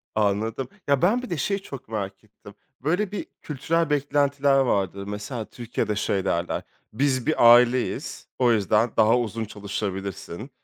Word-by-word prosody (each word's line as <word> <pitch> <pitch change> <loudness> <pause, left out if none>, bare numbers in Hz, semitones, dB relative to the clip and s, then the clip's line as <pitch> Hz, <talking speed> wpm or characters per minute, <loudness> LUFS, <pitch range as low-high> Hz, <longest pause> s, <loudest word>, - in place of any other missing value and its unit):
Anladım. 110 +4 0 0.2
Ya 140 -2 +3
ben 220 +8 +3
bir 255 - -8
de 170 - -2
şeyi 200 +8 -1
çok 140 -8 -9
merak 100 -3 -5
ettim. 105 -1 -16 0.3
Böyle 180 +8 0
bir 205 - -4 0.2
kültürel 160 +3 -1
beklentiler 140 -1 +2
vardır. 100 -6 0
Mesela 105 +3 -5
Türkiye'de 115 -2 -3
şey 100 -1 -1
derler, 85 -1 -1 0.3
biz 130 +1 +1
bir 120 -6 +7
aileyiz, 125 +1 +1
o 125 -2 +4
yüzden 110 +1 +2
daha 110 +2 +5
uzun 115 -1 -3
çalışabilirsin, 100 - -5
120 Hz, 145 wpm, -25 LUFS, 105-140 Hz, 0.3 s, bir